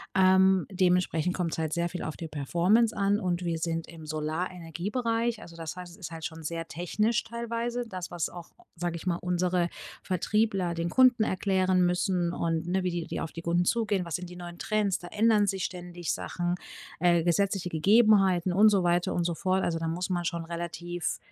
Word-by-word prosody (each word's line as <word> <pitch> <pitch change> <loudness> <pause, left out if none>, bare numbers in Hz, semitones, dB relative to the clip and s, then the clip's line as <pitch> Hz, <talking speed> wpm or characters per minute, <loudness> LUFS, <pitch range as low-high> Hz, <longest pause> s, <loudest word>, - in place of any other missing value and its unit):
Ähm, 190 0 +5
dementsprechend 180 -2 +1
kommt's 170 -4 -2
halt 160 -1 -1
sehr 170 0 0
viel 180 - -5
auf 155 - -4
die 165 -2 -7
Performance 175 - +2
an. 200 +1 +2
Und 180 -1 -1
wir 170 -1 -1
sind 165 0 -2
im 165 -2 -11
Solarenergiebereich. 180 - -2
Also 170 - -11
das 165 +1 -5
heißt, 180 -1 -8
es 175 - -14
ist 175 -3 -7
halt 160 -1 -8
schon 160 -1 -6
sehr 165 +1 -4
technisch, 210 +8 0
teilweise 235 +1 -3
das, 185 -2 -5
was 175 -3 -2
auch, 175 -1 -10 0.2
sage 170 0 -2
ich 170 - -7
mal, 175 -2 +1
unsere 180 0 0 0.4
Vertriebler 190 -1 0
den 170 +1 -2
Kunden 255 -4 +6
erklären 185 -2 +2
müssen 180 -1 0
und, 165 0 -1
ne, 185 +1 0
wie 180 - 0
die 170 -1 -3
die - - -4
auf 165 - -4
die 165 - -7
Kunden 175 +1 +1
zugehen. 205 -5 +1
Was 170 - -3
sind 180 -1 -5
die 180 - -10
neuen 175 -1 -9
Trends? 210 -3 0
Da 175 - -9
ändern 210 0 +3
sich 190 -1 -1
ständig 175 -2 -4
Sachen, 175 0 -2 0.5
äh, 170 -1 +4
gesetzliche 185 +1 +1
Gegebenheiten 190 0 +4
und 215 +3 +7
so 195 -3 +2
weiter 175 0 +2
und 175 - +1
so 170 0 0
fort. 185 +2 0
Also, 165 -1 0
da 165 - -2
muss 175 +3 -2
man 175 -1 0
schon 170 -1 -2
relativ 175 +1 -4
180 Hz, 200 wpm, -28 LUFS, 170-195 Hz, 0.5 s, und